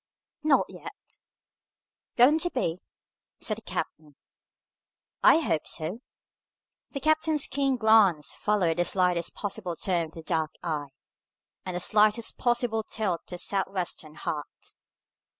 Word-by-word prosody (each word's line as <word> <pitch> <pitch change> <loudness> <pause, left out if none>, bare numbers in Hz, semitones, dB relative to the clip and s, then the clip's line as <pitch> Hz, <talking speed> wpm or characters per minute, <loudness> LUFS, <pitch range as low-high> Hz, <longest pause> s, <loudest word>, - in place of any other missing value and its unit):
"Not 300 -2 +3
yet." - - -12 1.0
"Going 270 +6 +6
to 350 - 0
be?" 180 - -2 0.6
said - - 0
the - - -10
captain. 150 -2 -5 1.1
"I - - +7
hope 160 - -1
so." 165 +8 -2 0.9
The 275 - -5
captain's 310 0 +2
keen 275 -1 0
glance 215 -9 +4
followed 185 -6 +1
the 175 - +2
slightest 180 -3 +1
possible 195 -4 -3
turn 175 -1 0
of 155 - -19
the 165 - -9
dark 160 -2 -1
eye, 150 -4 -2 0.8
and 180 - -3
the - - -1
slightest 215 +4 +2
possible 240 -2 +1
tilt 205 -5 -2
of - - -53
the 180 - -5
Sou'wester 185 -4 -2
hat. 150 -2 -6
195 Hz, 130 wpm, -27 LUFS, 170-240 Hz, 1.1 s, I